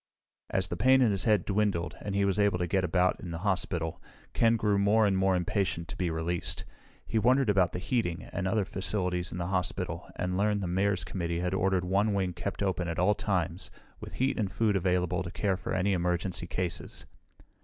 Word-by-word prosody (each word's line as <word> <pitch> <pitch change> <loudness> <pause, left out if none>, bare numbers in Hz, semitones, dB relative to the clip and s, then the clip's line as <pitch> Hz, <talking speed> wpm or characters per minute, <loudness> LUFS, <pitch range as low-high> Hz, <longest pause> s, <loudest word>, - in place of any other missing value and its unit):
As 95 -1 0
the 85 - -4
pain 130 +7 +5
in 115 - +3
his 100 - -1
head 105 -6 +3
dwindled, 100 -4 0
and 100 -1 -4
he 100 0 +2
was 100 +1 +1
able 100 -3 +3
to 90 - -1
get 95 +2 +1
about 90 +1 +2
in 90 - -7
the 85 - -4
hospital, 90 -4 -1 0.3
Ken 115 0 +4
grew 105 -2 +1
more 105 +2 +4
and 100 -2 +2
more 95 0 +2
impatient 90 -2 -1
to - - -5
be 90 -2 -1
released. 80 +1 -2 0.4
He 110 - 0
wondered 125 +1 +3
about 95 -3 +3
the - - -4
heating 95 -3 -1
and 95 -1 -1
other 100 +1 +1
facilities 90 -2 -1
in - - -5
the 85 - -2
hospital 95 0 -3
and 90 0 -2
learned 105 0 +1
the - - -2
Mayor's 95 0 +1
committee 85 -1 -3
had 90 +1 -1
ordered 95 -1 +1
one 100 +3 +1
wing 95 -2 0
kept 100 +4 -4
open 95 -2 -1
at 80 0 -3
all 90 +4 +4
times, 90 -4 -2 0.3
with - - -9
heat 130 0 0
and 100 -3 -1
food 110 -3 +1
available 90 -1 +1
to 90 - -4
care 100 +1 0
for 90 - -6
any 95 +1 +1
emergency 90 0 -1
cases. 90 -2 -4
95 Hz, 210 wpm, -29 LUFS, 90-100 Hz, 0.4 s, pain